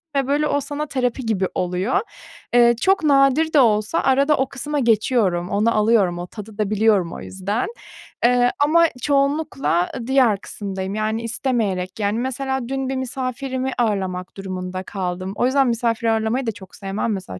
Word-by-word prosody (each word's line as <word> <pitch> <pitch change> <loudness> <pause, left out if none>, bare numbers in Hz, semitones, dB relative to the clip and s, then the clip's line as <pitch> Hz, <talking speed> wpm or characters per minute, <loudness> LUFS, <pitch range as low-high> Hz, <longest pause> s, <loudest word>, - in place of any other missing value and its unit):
ve, 270 -1 +1
böyle, 295 +2 +1
o 285 0 +1
sana 290 +2 -4
terapi 250 -1 -2
gibi 200 -4 0
oluyor. 180 +6 0 0.6
Iıı, 240 0 +6
çok 375 +8 +2
nadir 280 +2 +3
de 290 - +6
olsa 215 -3 +3
arada 275 +3 +3
o 265 0 0
kısma 290 +2 -3
geçiyorum, 215 -6 +1
onu 215 +3 +1
alıyorum. 210 -5 +3
O 175 - -5
tadı 210 +1 -10
da 210 -2 0
biliyorum 205 -5 +2
o - - -7
yüzden, 200 +5 -3 0.6
ııı, 245 0 +4
ama 330 +4 +5 0.2
çoğunlukla 280 - +1 0.2
diğer 250 -7 +3
kısımdayım, 195 -1 -5
yani, 220 +2 -1
istemeyerek. 220 -5 -2
Yani, 205 +2 0
mesela 265 0 -2
dün 270 -1 -2
bir 270 - -2
misafirimi 260 0 -3
ağırlamak 190 -5 -2
durumunda 185 -1 -5
kaldım. 185 0 -4
O 245 - +1
yüzden 270 0 +3
misafir 230 -1 0
ağırlamayı 225 +3 0
da 225 - +1
çok 195 -3 -13
sevmem 200 +3 -2
mesela 185 - -6
230 Hz, 160 wpm, -21 LUFS, 195-265 Hz, 0.6 s, Iıı